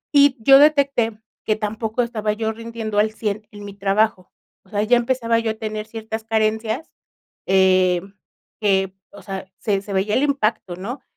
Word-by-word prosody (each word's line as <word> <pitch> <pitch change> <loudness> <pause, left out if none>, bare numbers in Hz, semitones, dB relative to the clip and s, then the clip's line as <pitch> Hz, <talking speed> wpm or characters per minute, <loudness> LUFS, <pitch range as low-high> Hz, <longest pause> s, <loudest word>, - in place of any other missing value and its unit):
Y 285 -1 +6
yo 270 +3 +8
detecté 275 -7 +3 0.2
que 215 - +1
tampoco 220 +2 -2
estaba 220 -3 -2
yo 220 0 -2
rindiendo 225 -2 -4
al 215 +1 +2
100 215 -1 -3
en 205 -1 -11
mi 200 - -8
trabajo, 195 0 0 0.3
o 190 - -25
sea 205 0 0
ya 245 +3 +4
empezaba 235 -1 +1
yo 225 -1 -1
a - - -3
tener 215 -1 -5
ciertas 220 0 -6
carencias, 220 +4 -1 0.6
em, 185 0 +3 0.5
que, 195 -2 +2 0.2
o 200 - -13
sea, 195 -2 -6
se 200 -2 0
se 200 - -9
veía 195 +2 0
el 260 - +2
impacto, 220 -9 0
¿no? 230 +9 -6
215 Hz, 170 wpm, -21 LUFS, 200-230 Hz, 0.6 s, yo